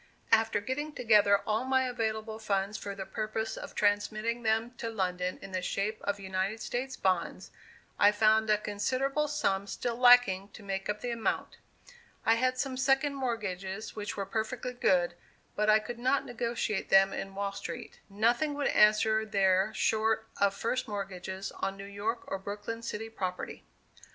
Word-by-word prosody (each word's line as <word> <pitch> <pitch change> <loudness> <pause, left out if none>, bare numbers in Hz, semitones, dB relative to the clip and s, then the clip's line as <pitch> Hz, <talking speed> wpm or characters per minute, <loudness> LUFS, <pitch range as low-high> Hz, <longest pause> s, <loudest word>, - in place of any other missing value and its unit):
After 225 -1 +4
getting 295 +8 -3
together 210 -5 +4
all 215 +2 0
my 260 0 +2
available 220 -3 -2
funds 200 -1 -1
for 200 0 -5
the 195 -1 -5
purpose 220 +1 -3
of - - -8
transmitting 215 +3 +1
them 225 +1 +1
to 230 - -3
London 180 -4 -2
in 195 - -8
the 185 -1 -2
shape 200 +4 -2
of 200 0 -2
United 190 +2 -2
States 255 +4 -3
bonds, 185 -3 -1 0.5
I 205 - +7
found 215 +1 +3
a 210 - +5
considerable 260 +8 -1
sum 200 -10 0
still 235 +4 -3
lacking 245 -6 +6
to 215 - -11
make 195 0 -4
up 210 0 -2
the 245 - -2
amount. 230 -1 -2 0.7
I 225 - +6
had 255 +2 +1
some 260 -1 -2
second 270 +2 +2
mortgages 215 -6 -4
which 210 -1 -5
were 200 - -2
perfectly 225 +5 -3
good, 180 -7 +2 0.4
but 210 +1 +1
I 215 - +7
could 235 +2 -6
not 260 +3 +1
negotiate 235 -3 -2
them 195 0 +6
in 195 0 -5
Wall 200 0 -2
Street. 235 +4 -7
Nothing 240 +9 +1
would 285 -1 0
answer 215 +1 +4
there 195 -1 +2
short 220 0 +1
of 200 0 +2
first 240 +3 -1
mortgages 190 -2 -5
on 195 0 -3
New 195 - -8
York 205 +4 -3
or 195 - -4
Brooklyn 205 +3 -5
city 225 -1 -5
property. 185 -4 -5
215 Hz, 165 wpm, -30 LUFS, 195-235 Hz, 0.7 s, I